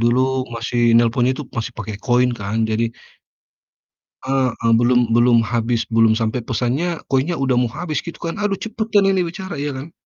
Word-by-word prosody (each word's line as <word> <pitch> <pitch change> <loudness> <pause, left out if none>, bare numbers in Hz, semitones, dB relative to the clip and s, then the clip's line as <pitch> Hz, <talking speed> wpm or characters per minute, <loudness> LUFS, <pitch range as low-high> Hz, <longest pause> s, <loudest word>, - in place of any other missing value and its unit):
Dulu 120 +2 +3 0.3
masih 115 +1 -3 0.2
nelpon 120 +1 +3
itu 130 +3 -3
masih 120 +1 -3
pakai 105 -2 -5
koin 125 0 +3
kan, 100 +2 -3
jadi 110 +2 +1 1.4
Heeh, 130 -2 +1 0.3
belum 120 -1 +2
belum 120 0 +4
habis, 115 +1 -1
belum 115 -1 +4
sampai 110 +1 -1
pesannya, 135 +8 -1
koinnya 135 +6 +1
udah 135 -3 0
mau 125 - +1
habis, 155 +3 -3
gitu 170 - -8
kan. 165 +3 -4
"Aduh, 205 -1 0
cepetan 220 -1 0
ini 190 -1 +1
bicara," 185 -3 -6
iya, 145 -1 -3
kan? 140 +5 -8
125 Hz, 165 wpm, -20 LUFS, 115-155 Hz, 1.4 s, belum